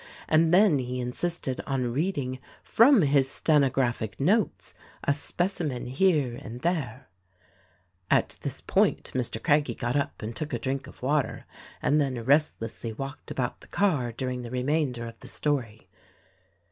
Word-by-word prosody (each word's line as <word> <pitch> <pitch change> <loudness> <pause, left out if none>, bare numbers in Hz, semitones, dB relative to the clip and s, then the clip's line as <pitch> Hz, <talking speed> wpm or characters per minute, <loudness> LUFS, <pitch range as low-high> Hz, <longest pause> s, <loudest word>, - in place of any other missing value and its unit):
And 160 +1 +4
he - - +1
then 180 -4 +5
insisted 125 +4 -2
on 125 -3 -1
reading 140 -4 -1 0.2
from 230 - +5
his 140 -2 +3
stenographic 135 -7 +1
notes 200 +10 +1 0.3
a 140 - +3
specimen 155 -3 -2
here 135 -2 +2
and 120 -1 -8
there 140 -8 -2 0.5
" 95 -1 -35 0.3
At - - +2
this - - -5
point - - +1
Mr. 120 -3 -2
Craggie 145 -5 +2
got 120 +2 -2
up 140 -5 -2
and 110 +2 -5
took 155 -2 -4
a - - +1
drink 130 +3 -3
of - - -15
water 140 -3 0 0.4
and 150 +1 +3
then 130 -5 -2
restlessly 125 -5 +1
walked 135 +5 -7
about 125 -2 -3
the - - -15
car 150 -12 +1
during 125 +1 -3
the 120 - -7
remainder 130 -1 -1
of 115 -1 -9
the 125 - -11
story. 125 -8 -2
135 Hz, 150 wpm, -27 LUFS, 120-150 Hz, 0.5 s, then